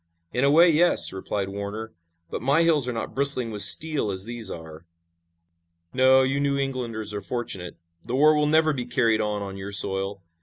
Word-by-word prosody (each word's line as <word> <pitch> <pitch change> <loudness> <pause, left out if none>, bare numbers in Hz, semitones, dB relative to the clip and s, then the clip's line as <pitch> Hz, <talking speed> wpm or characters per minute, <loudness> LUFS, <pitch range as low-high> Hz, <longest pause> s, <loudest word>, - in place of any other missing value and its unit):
"In 125 - 0
a 140 - +4
way, 165 +5 +6
yes," 170 +2 +3
replied 95 +1 -4
Warner, 100 +3 -7 0.4
"but - - -5
my 140 +7 +2
hills 155 -6 +2
are - - -1
not 115 -2 -6
bristling 135 -4 +1
with 105 -1 -2
steel 145 +4 +3
as 95 0 -2
these 115 -3 -5
are." 80 -2 -10 1.1
"No, 130 +1 +4
you 135 +1 -1
New 140 -1 0
Englanders 120 -6 -4
are 105 - -5
fortunate. 95 -6 -5 0.3
The 125 - -3
war 155 +3 +4
will 150 0 +1
never 155 0 +3
be 125 -3 -5
carried 115 -3 +1
on 105 -1 -3
on 95 -1 -8
your 95 +1 -7
soil. 95 0 0
120 Hz, 190 wpm, -24 LUFS, 100-140 Hz, 1.1 s, way